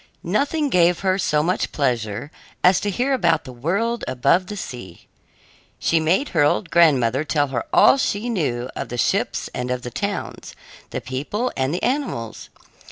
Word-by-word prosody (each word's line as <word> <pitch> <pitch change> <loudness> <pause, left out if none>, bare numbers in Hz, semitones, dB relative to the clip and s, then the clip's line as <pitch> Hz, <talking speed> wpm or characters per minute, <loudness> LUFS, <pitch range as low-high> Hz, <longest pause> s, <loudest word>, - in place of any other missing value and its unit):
Nothing 285 - 0
gave 175 -5 +3
her 190 0 +1
so 150 -5 +1
much 180 +3 -1
pleasure 120 -2 -2 0.3
as 180 +1 +5
to 205 - -2
hear 250 +8 0
about 170 -10 +2
the 130 - -10
world 200 - -1
above 140 +9 +2
the 210 - -6
sea. 120 - -8 0.7
She 165 - +1
made 175 - +1
her 160 - +1
old 165 +4 +1
grandmother 135 -6 +4
tell 145 -2 0
her 130 - -3
all 275 - +6
she 215 -3 -1
knew 140 - -1
of - - -5
the 120 - -5
ships 115 - 0
and 125 0 -3
of 125 0 -2
the 125 - -6
towns, 200 - -5 0.3
the - - -4
people 150 - -3
and 130 +1 0
the 175 - -3
animals. 245 - -2
165 Hz, 170 wpm, -22 LUFS, 130-200 Hz, 0.7 s, all